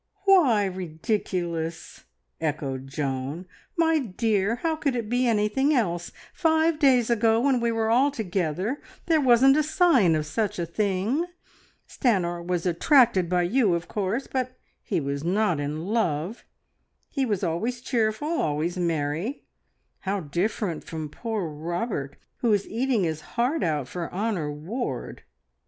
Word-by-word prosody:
"Why 285 Hz, -, +5 dB
ridiculous?" 170 Hz, -, -3 dB, 0.3 s
echoed 140 Hz, -4 st, -3 dB
Joan. 135 Hz, +4 st, -3 dB, 0.3 s
"My 325 Hz, -1 st, +3 dB
dear, 220 Hz, -2 st, 0 dB
how 325 Hz, -1 st, +1 dB
could 280 Hz, -4 st, -1 dB
it 230 Hz, -3 st, -3 dB
be 250 Hz, +1 st, +2 dB
anything 230 Hz, +7 st, +2 dB
else? 175 Hz, -8 st, -1 dB, 0.2 s
Five 320 Hz, -1 st, +2 dB
days 255 Hz, -5 st, +4 dB
ago, 225 Hz, 0 st, +3 dB
when 265 Hz, 0 st, +2 dB
we 235 Hz, 0 st, +1 dB
were 225 Hz, -1 st, 0 dB
all 260 Hz, +5 st, +4 dB
together, 195 Hz, -, -2 dB, 0.2 s
there 320 Hz, -3 st, +3 dB
wasn't 265 Hz, +2 st, +6 dB
a -, -, +4 dB
sign 305 Hz, -, +4 dB
of 155 Hz, -1 st, -1 dB
such 210 Hz, +6 st, -2 dB
a 170 Hz, -, -1 dB
thing. 205 Hz, -, 0 dB, 0.6 s
Stanor 175 Hz, -8 st, 0 dB
was 175 Hz, 0 st, -2 dB
attracted 190 Hz, -, +4 dB
by 180 Hz, -1 st, +2 dB
you, 200 Hz, 0 st, +2 dB
of 170 Hz, +1 st, -4 dB
course; 210 Hz, +6 st, -2 dB
but 255 Hz, -1 st, -3 dB, 0.2 s
he -, -, -1 dB
was 140 Hz, 0 st, -3 dB
not 180 Hz, -2 st, +1 dB
in 150 Hz, +3 st, -3 dB
love. 195 Hz, -2 st, -1 dB, 0.7 s
He 275 Hz, -, 0 dB
was 205 Hz, -6 st, -1 dB
always 215 Hz, +9 st, -1 dB
cheerful, 230 Hz, +1 st, 0 dB
always 170 Hz, -, -1 dB
merry. 165 Hz, -, -2 dB, 0.5 s
How 195 Hz, 0 st, -2 dB
different 175 Hz, +3 st, -2 dB
from 155 Hz, -2 st, -6 dB
poor 220 Hz, +1 st, -3 dB
Robert, 160 Hz, -, -3 dB, 0.2 s
who 235 Hz, -, +1 dB
is 200 Hz, -1 st, 0 dB
eating 240 Hz, -2 st, 0 dB
his 160 Hz, -2 st, -2 dB, 0.2 s
heart 255 Hz, +7 st, +1 dB
out 150 Hz, -5 st, 0 dB
for 170 Hz, +2 st, -5 dB
Honor 190 Hz, -6 st, -1 dB
Ward!" 155 Hz, -, -5 dB
205 Hz, 145 wpm, -26 LUFS, 165-245 Hz, 0.7 s, wasn't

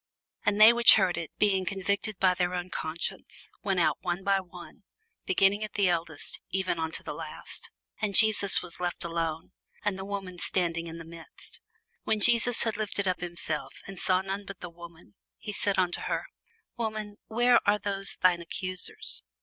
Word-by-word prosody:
And 205 Hz, 0 st, +1 dB
they 220 Hz, +2 st, +9 dB
which 235 Hz, -1 st, +8 dB
heard 190 Hz, -4 st, +2 dB
it, 165 Hz, -, -5 dB
being 195 Hz, -3 st, +2 dB
convicted 200 Hz, +2 st, -2 dB
by 185 Hz, -1 st, +3 dB
their 180 Hz, 0 st, -1 dB
own 180 Hz, 0 st, -5 dB
conscience, 160 Hz, +2 st, -5 dB
went 195 Hz, -3 st, 0 dB
out 170 Hz, -, +1 dB
one 180 Hz, +1 st, -3 dB
by 195 Hz, 0 st, +2 dB
one, 180 Hz, +5 st, -12 dB, 0.5 s
beginning 195 Hz, +3 st, +3 dB
at 215 Hz, -, -6 dB
the 200 Hz, -3 st, +3 dB
eldest, 165 Hz, -3 st, -2 dB
even 185 Hz, -3 st, -1 dB
unto 160 Hz, 0 st, -3 dB
the -, -, -5 dB
last: -, -, -6 dB, 0.3 s
and 205 Hz, -2 st, -1 dB
Jesus 215 Hz, -3 st, +6 dB
was 175 Hz, -2 st, -8 dB
left 175 Hz, -1 st, -2 dB
alone, 165 Hz, -1 st, -3 dB, 0.3 s
and 200 Hz, -2 st, -1 dB
the -, -, -5 dB
woman 195 Hz, -3 st, -6 dB
standing 170 Hz, -2 st, -1 dB
in 165 Hz, 0 st, -8 dB
the 165 Hz, -, -9 dB
midst. 165 Hz, 0 st, -12 dB, 0.4 s
When 220 Hz, -1 st, 0 dB
Jesus 235 Hz, +2 st, +4 dB
had 225 Hz, -2 st, -2 dB
lifted 200 Hz, -2 st, -2 dB
up 185 Hz, -1 st, -1 dB
himself, 170 Hz, -3 st, -3 dB
and 195 Hz, -1 st, -9 dB
saw 185 Hz, -1 st, +2 dB
none 195 Hz, +1 st, -4 dB
but 195 Hz, -1 st, -10 dB
the 180 Hz, -, -8 dB
woman, 170 Hz, 0 st, -14 dB, 0.2 s
he 210 Hz, -, -7 dB
said 200 Hz, -1 st, 0 dB
unto 180 Hz, -1 st, +1 dB
her, -, -, -2 dB, 0.5 s
Woman, 215 Hz, -3 st, -4 dB
where 240 Hz, +2 st, +4 dB
are 210 Hz, -, +4 dB
those 200 Hz, -1 st, 0 dB
thine 180 Hz, -2 st, +3 dB
accusers? 185 Hz, +1 st, -2 dB
190 Hz, 180 wpm, -28 LUFS, 175-205 Hz, 0.5 s, they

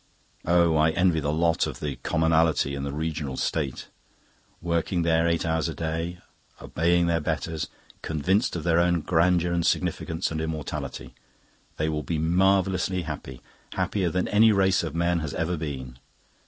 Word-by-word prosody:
Oh, 85 Hz, -2 st, +4 dB
I 80 Hz, +1 st, +4 dB
envy 85 Hz, 0 st, +2 dB
the 75 Hz, -1 st, -1 dB
lot 80 Hz, +1 st, +1 dB
of -, -, -6 dB
the 70 Hz, -4 st, -4 dB
commonality 80 Hz, 0 st, +2 dB
in 70 Hz, -, -4 dB
the 70 Hz, 0 st, -3 dB
Rational 75 Hz, -2 st, -3 dB
State! 70 Hz, -5 st, -2 dB, 0.7 s
Working 85 Hz, +1 st, -1 dB
their 80 Hz, 0 st, +2 dB
eight 85 Hz, 0 st, 0 dB
hours 80 Hz, 0 st, 0 dB
a 80 Hz, -, -5 dB
day, 80 Hz, +2 st, -3 dB, 0.4 s
obeying 85 Hz, +2 st, +1 dB
their 85 Hz, -1 st, +1 dB
betters, 80 Hz, 0 st, -3 dB, 0.3 s
convinced 90 Hz, +8 st, 0 dB
of 85 Hz, -, -4 dB
their 85 Hz, -1 st, +3 dB
own 85 Hz, -1 st, +2 dB
grandeur 85 Hz, +1 st, +2 dB
and 85 Hz, -1 st, 0 dB
significance 80 Hz, +1 st, -1 dB
and 80 Hz, -1 st, -2 dB
immortality, 80 Hz, -5 st, -5 dB, 0.6 s
they 80 Hz, -, 0 dB
will 75 Hz, -1 st, -1 dB
be 80 Hz, +2 st, -3 dB
marvellously 95 Hz, +2 st, +2 dB
happy, 70 Hz, -5 st, -7 dB, 0.3 s
happier 95 Hz, -4 st, 0 dB
than 90 Hz, +3 st, -1 dB
any 110 Hz, +2 st, +5 dB
race 95 Hz, -2 st, +3 dB
of 80 Hz, -1 st, -5 dB
men 85 Hz, +1 st, +1 dB
has 75 Hz, -3 st, -4 dB
ever 85 Hz, +2 st, -1 dB
been. 65 Hz, -6 st, -6 dB
80 Hz, 160 wpm, -26 LUFS, 80-85 Hz, 0.7 s, any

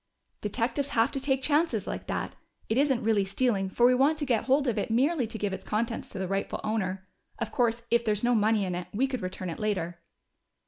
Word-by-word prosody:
"Detectives 245 Hz, +6 st, -1 dB
have 225 Hz, +1 st, +4 dB
to 275 Hz, -, -1 dB
take 265 Hz, -1 st, 0 dB
chances 315 Hz, +4 st, +2 dB
like -, -, -5 dB
that. -, -, -3 dB, 0.4 s
It 225 Hz, -, +2 dB
isn't 270 Hz, -4 st, +2 dB
really 215 Hz, -2 st, +3 dB
stealing, 195 Hz, -1 st, 0 dB
for 240 Hz, +5 st, +3 dB
we 250 Hz, -, +6 dB
want 275 Hz, +5 st, +3 dB
to 295 Hz, -, -1 dB
get 235 Hz, -5 st, +1 dB
hold 275 Hz, +2 st, +3 dB
of 235 Hz, -5 st, 0 dB
it 205 Hz, -, -2 dB
merely 260 Hz, +3 st, +2 dB
to 225 Hz, 0 st, -6 dB
give 205 Hz, -2 st, -2 dB
its -, -, -5 dB
contents 230 Hz, +2 st, -2 dB
to -, -, -8 dB
the 190 Hz, 0 st, -2 dB
rightful 195 Hz, +1 st, -2 dB
owner. 190 Hz, -3 st, -2 dB, 0.3 s
Of -, -, -3 dB
course, 235 Hz, -2 st, +1 dB
if 235 Hz, 0 st, +4 dB
there's 215 Hz, -1 st, 0 dB
no 245 Hz, +1 st, +3 dB
money 215 Hz, -2 st, +3 dB
in 180 Hz, -, -2 dB
it, 175 Hz, 0 st, -4 dB
we 255 Hz, +6 st, +3 dB
could 265 Hz, -3 st, -3 dB
return 185 Hz, -1 st, -4 dB
it -, -, -7 dB
later." 175 Hz, -5 st, -2 dB
225 Hz, 230 wpm, -28 LUFS, 200-260 Hz, 0.4 s, we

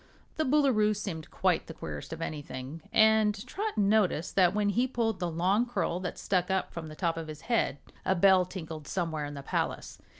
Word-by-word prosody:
The 315 Hz, -, +1 dB
Boolooroo 255 Hz, -7 st, +3 dB
seemed 175 Hz, -6 st, -5 dB
quite -, -, +1 dB
the -, -, -8 dB
queerest 75 Hz, -2 st, -7 dB
of 165 Hz, 0 st, -4 dB
anything, 145 Hz, 0 st, -6 dB
and 220 Hz, -1 st, +5 dB
Trot 425 Hz, +2 st, -4 dB
noticed 200 Hz, -5 st, +2 dB
that 185 Hz, 0 st, +4 dB
when 210 Hz, -1 st, +2 dB
he 240 Hz, +5 st, +2 dB
pulled 225 Hz, -5 st, -1 dB
the 175 Hz, -1 st, -1 dB
long 185 Hz, +8 st, +1 dB
curl 210 Hz, -7 st, -1 dB
that 180 Hz, -1 st, -4 dB
stuck 180 Hz, -2 st, 0 dB
up 190 Hz, 0 st, -1 dB
from 165 Hz, -2 st, -6 dB
the 155 Hz, -, -9 dB
top 165 Hz, -1 st, -1 dB
of 165 Hz, -1 st, -5 dB
his 155 Hz, -1 st, -8 dB
head 230 Hz, -, 0 dB, 0.3 s
a 190 Hz, -, +2 dB
bell 190 Hz, +1 st, +6 dB
tinkled 160 Hz, -5 st, -7 dB
somewhere 165 Hz, -5 st, -2 dB
in 145 Hz, 0 st, -7 dB
the 140 Hz, -, -7 dB
palace. -, -, -3 dB
185 Hz, 200 wpm, -29 LUFS, 160-215 Hz, 0.3 s, bell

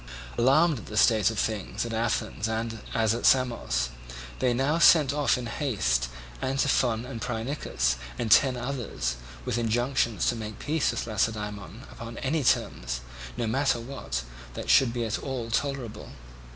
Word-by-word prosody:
Alarmed 140 Hz, +4 st, +4 dB
at -, -, -11 dB
the 105 Hz, -, -5 dB
state 110 Hz, -2 st, +5 dB
of 110 Hz, -, -5 dB
things 110 Hz, +1 st, -2 dB
at 115 Hz, -, -5 dB
Athens 110 Hz, -1 st, -1 dB, 0.5 s
as 110 Hz, -1 st, +3 dB
at 115 Hz, -, -4 dB
Samos, 115 Hz, -, +2 dB, 0.5 s
they 125 Hz, -, +2 dB
now 135 Hz, +7 st, +1 dB
sent 150 Hz, -5 st, +6 dB
off 145 Hz, -3 st, +2 dB
in 125 Hz, -, -5 dB
haste 100 Hz, -, 0 dB, 0.3 s
Antiphon 130 Hz, -3 st, +1 dB
and 120 Hz, -3 st, -7 dB
Phrynichus 110 Hz, -, -1 dB, 0.2 s
and 115 Hz, -3 st, -2 dB
ten 130 Hz, +1 st, +6 dB
others 120 Hz, -, -3 dB, 0.3 s
with 120 Hz, -, -1 dB
injunctions 120 Hz, 0 st, +1 dB
to 120 Hz, -, 0 dB
make 110 Hz, -2 st, -6 dB
peace 155 Hz, 0 st, 0 dB
with -, -, -2 dB
Lacedaemon 105 Hz, -1 st, -3 dB
upon 115 Hz, 0 st, -8 dB
any 145 Hz, +2 st, -1 dB
terms, -, -, 0 dB, 0.4 s
no -, -, -1 dB
matter 130 Hz, +2 st, +1 dB
what, 115 Hz, -, -4 dB, 0.3 s
that -, -, -1 dB
should 135 Hz, -4 st, +5 dB
be 120 Hz, -1 st, -2 dB
at 110 Hz, 0 st, -2 dB
all 125 Hz, -4 st, -4 dB
tolerable. 135 Hz, -4 st, -2 dB
115 Hz, 150 wpm, -27 LUFS, 110-135 Hz, 0.5 s, sent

